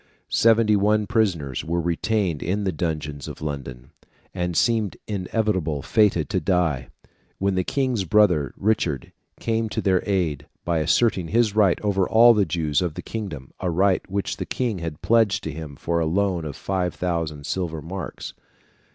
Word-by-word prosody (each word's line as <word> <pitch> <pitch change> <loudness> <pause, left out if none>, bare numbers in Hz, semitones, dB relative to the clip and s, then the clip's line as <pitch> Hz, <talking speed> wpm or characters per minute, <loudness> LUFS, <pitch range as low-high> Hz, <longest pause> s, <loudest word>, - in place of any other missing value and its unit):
Seventy 115 -1 +4
one 105 +1 +2
prisoners 90 - 0
were 85 +2 -1
retained 85 0 0
in 100 +4 -1
the 95 - 0
dungeons 75 -3 -3
of - - -8
London, 70 -3 -6 0.4
and 90 -2 -2
seemed 110 -5 +1
inevitably 95 - -1
fated 105 -8 +2
to - - +1
die, 80 -8 0 0.5
when 100 0 0
the 95 0 +1
king's 130 -2 0
brother, 90 - +3
Richard, 90 - 0 0.3
came 115 -1 -1
to 110 - -3
their 95 -4 +2
aid, 80 -7 0 0.2
by 85 -1 +1
asserting 95 +2 +2
his 110 +1 +2
right 100 -5 +4
over 95 -3 +1
all 120 +1 +7
the 105 -3 +2
Jews 80 0 0
of 85 -4 -2
the - - -6
kingdom 85 -13 -6
a 90 - -1
right 95 +3 +2
which 100 +1 -2
the - - -4
King 120 -7 -2
had 80 -3 -6
pledged 115 -3 +3
to 80 - -3
him 75 -1 -8
for 85 +4 -1
a 80 - 0
loan 90 -1 0
of 75 - -5
5,000 85 -5 -2
silver 85 -3 -2
marks. 90 +5 -6
90 Hz, 165 wpm, -23 LUFS, 80-105 Hz, 0.5 s, all